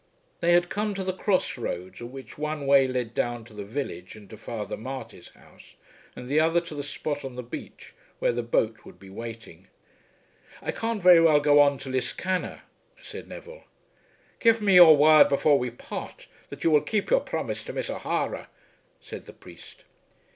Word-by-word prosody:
They 170 Hz, 0 st, +3 dB
had 175 Hz, 0 st, +4 dB
come 210 Hz, 0 st, -2 dB
to 190 Hz, -, -3 dB
the 185 Hz, 0 st, -2 dB
cross 185 Hz, -7 st, -1 dB
roads 95 Hz, -3 st, -5 dB
at 120 Hz, -, -6 dB
which 130 Hz, -2 st, -11 dB
one 150 Hz, -1 st, -4 dB
way 135 Hz, -1 st, +5 dB
led 125 Hz, -3 st, -3 dB
down 120 Hz, -1 st, -2 dB
to 115 Hz, -, -16 dB
the 105 Hz, -1 st, -7 dB
village 100 Hz, -6 st, -6 dB
and 105 Hz, -2 st, -14 dB
to -, -, -8 dB
Father 110 Hz, 0 st, -6 dB
Marty's 115 Hz, -6 st, -8 dB
house, -, -, -20 dB, 0.4 s
and 125 Hz, -, -9 dB
the 145 Hz, +4 st, +2 dB
other 165 Hz, +2 st, +3 dB
to 170 Hz, -2 st, -9 dB
the 145 Hz, -, -4 dB
spot 145 Hz, 0 st, -5 dB
on 130 Hz, -2 st, -7 dB
the 125 Hz, -, -6 dB
beach 120 Hz, -, -10 dB, 0.2 s
where -, -, +1 dB
the 120 Hz, 0 st, -2 dB
boat 115 Hz, -1 st, -1 dB
would -, -, -14 dB
be 95 Hz, -1 st, -14 dB
waiting. 115 Hz, -4 st, -9 dB, 0.9 s
"I -, -, -3 dB
can't 225 Hz, -3 st, -3 dB
very 175 Hz, -2 st, +8 dB
well 155 Hz, -3 st, +5 dB
go 145 Hz, 0 st, +4 dB
on 140 Hz, -1 st, +3 dB
to 135 Hz, 0 st, -9 dB
Liscannor," 180 Hz, +8 st, -3 dB, 0.4 s
said -, -, -10 dB
Neville. -, -, -11 dB, 0.7 s
"Give 230 Hz, -1 st, +4 dB
me 205 Hz, -2 st, +2 dB
your 170 Hz, -4 st, +9 dB
word 155 Hz, +1 st, +7 dB
before 140 Hz, 0 st, +3 dB
we 125 Hz, -, -2 dB
part 120 Hz, -, -9 dB, 0.2 s
that -, -, -9 dB
you 165 Hz, -, +3 dB
will 150 Hz, -1 st, +5 dB
keep 215 Hz, -, -2 dB
your -, -, +4 dB
promise -, -, -4 dB
to -, -, -7 dB
Miss -, -, -3 dB
O'Hara," -, -, -3 dB, 0.5 s
said -, -, -10 dB
the -, -, -11 dB
priest. -, -, -15 dB
140 Hz, 190 wpm, -26 LUFS, 115-170 Hz, 0.9 s, your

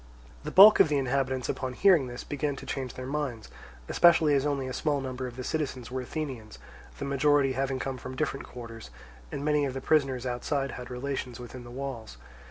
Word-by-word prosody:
The -, -, -4 dB
bulk 205 Hz, +3 st, +9 dB
of -, -, +6 dB
the 150 Hz, -, +2 dB
inhabitants, 130 Hz, -1 st, 0 dB
upon 130 Hz, -1 st, -3 dB
hearing 175 Hz, -3 st, +4 dB
this, 120 Hz, 0 st, -7 dB
began 145 Hz, 0 st, -2 dB
to -, -, -9 dB
change 130 Hz, -3 st, -4 dB
their 130 Hz, -, -6 dB
minds, 135 Hz, -5 st, -3 dB, 0.4 s
especially 165 Hz, -3 st, +5 dB
as 140 Hz, +1 st, +2 dB
only 140 Hz, -2 st, -1 dB
a 130 Hz, -, -5 dB
small 145 Hz, 0 st, 0 dB
number 130 Hz, -1 st, -4 dB
of 120 Hz, -, -9 dB
the 130 Hz, -, -6 dB
citizens 130 Hz, -5 st, -3 dB
were 130 Hz, 0 st, -2 dB
Athenians, 125 Hz, -6 st, -6 dB, 0.4 s
the -, -, -4 dB
majority 140 Hz, 0 st, +3 dB
having 135 Hz, +1 st, -1 dB
come 130 Hz, 0 st, -4 dB
from 130 Hz, +2 st, -7 dB
different 140 Hz, -1 st, -2 dB
quarters, 115 Hz, -, -9 dB, 0.4 s
and 140 Hz, -, -4 dB
many 150 Hz, -1 st, +2 dB
of 135 Hz, -2 st, -2 dB
the -, -, -2 dB
prisoners 135 Hz, -3 st, +1 dB
outside 135 Hz, +2 st, -2 dB
had 125 Hz, -1 st, -8 dB
relations 125 Hz, -1 st, -4 dB
within 125 Hz, +1 st, -9 dB
the 120 Hz, -, -11 dB
walls. 120 Hz, -, -6 dB
135 Hz, 200 wpm, -28 LUFS, 125-145 Hz, 0.4 s, bulk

